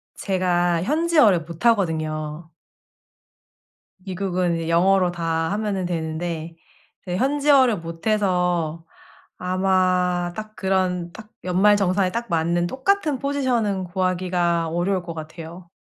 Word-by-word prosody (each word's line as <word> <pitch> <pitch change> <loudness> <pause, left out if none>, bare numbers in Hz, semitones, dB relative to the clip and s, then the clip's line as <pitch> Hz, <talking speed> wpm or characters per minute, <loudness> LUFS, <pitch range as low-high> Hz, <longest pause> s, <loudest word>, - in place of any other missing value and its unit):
제가 175 -3 0
현지어를 300 - +3
못하거든요. 160 -4 -1 1.5
미국은 185 -2 -2
이 165 0 -4
영어로 180 +2 +3
다 165 -1 -1
하면은 205 -3 -2
되는데 165 0 -4 0.5
네 180 0 -2
현지어를 275 -3 +3
못해서 175 -2 -1 0.5
아마 180 -1 +1
딱 215 0 -8
그런 185 -3 -1
딱 215 +2 -12
연말 190 +3 +4
정산에 185 -1 +1
딱 235 +1 -3
맞는 170 +1 +1
똑같은 290 - 0
포지션은 245 -9 0
구하기가 175 -2 0
어려울 175 +3 -1
것 170 -1 -6
같아요. 165 +2 -9
180 Hz, 245 characters per minute, -22 LUFS, 170-205 Hz, 1.5 s, 연말